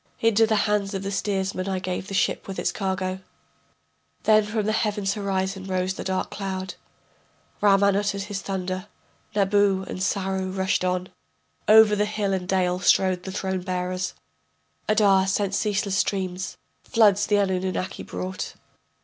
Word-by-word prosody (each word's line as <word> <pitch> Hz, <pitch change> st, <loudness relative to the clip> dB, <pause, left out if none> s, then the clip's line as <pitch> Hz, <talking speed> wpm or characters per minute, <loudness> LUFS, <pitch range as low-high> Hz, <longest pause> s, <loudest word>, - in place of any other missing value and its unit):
Into 225 Hz, 0 st, +4 dB
the 220 Hz, -, +2 dB
hands 205 Hz, -1 st, 0 dB
of 195 Hz, -, -3 dB
the 195 Hz, -, -3 dB
steersman 195 Hz, -1 st, -1 dB
I 190 Hz, -, -1 dB
gave 185 Hz, 0 st, -4 dB
the 195 Hz, -, -4 dB
ship -, -, 0 dB
with 195 Hz, -, -6 dB
its -, -, 0 dB
cargo. 190 Hz, -1 st, -2 dB, 1.0 s
Then 215 Hz, -1 st, +5 dB
from 215 Hz, -1 st, -1 dB
the 215 Hz, -, +1 dB
heaven's 210 Hz, -3 st, 0 dB
horizon 195 Hz, -2 st, -2 dB
rose 185 Hz, 0 st, -1 dB
the -, -, -6 dB
dark 190 Hz, 0 st, -2 dB
cloud 190 Hz, -2 st, -4 dB, 0.9 s
Raman 200 Hz, -1 st, +4 dB
uttered 200 Hz, -1 st, 0 dB
his 205 Hz, -1 st, -5 dB
thunder, 185 Hz, -1 st, -4 dB, 0.5 s
Nabu 200 Hz, -1 st, +2 dB
and -, -, -5 dB
Sarru 190 Hz, 0 st, -1 dB
rushed 190 Hz, -1 st, +1 dB
on, 180 Hz, 0 st, -1 dB, 0.6 s
Over 215 Hz, 0 st, +8 dB
hill 210 Hz, -2 st, -1 dB
and 185 Hz, -1 st, -3 dB
dale 180 Hz, -1 st, +1 dB
strode 185 Hz, -1 st, +3 dB
the 190 Hz, -, -6 dB
throne 190 Hz, -1 st, -2 dB
bearers, 180 Hz, 0 st, -3 dB, 0.7 s
Adar 200 Hz, -3 st, +4 dB
sent 195 Hz, 0 st, 0 dB
ceaseless 200 Hz, -2 st, 0 dB
streams, 190 Hz, -1 st, -2 dB, 0.3 s
floods 205 Hz, -4 st, +3 dB
the 210 Hz, -, +3 dB
Anunnaki 185 Hz, -1 st, -1 dB
brought. 90 Hz, +1 st, -5 dB
195 Hz, 150 wpm, -25 LUFS, 185-205 Hz, 1.0 s, Over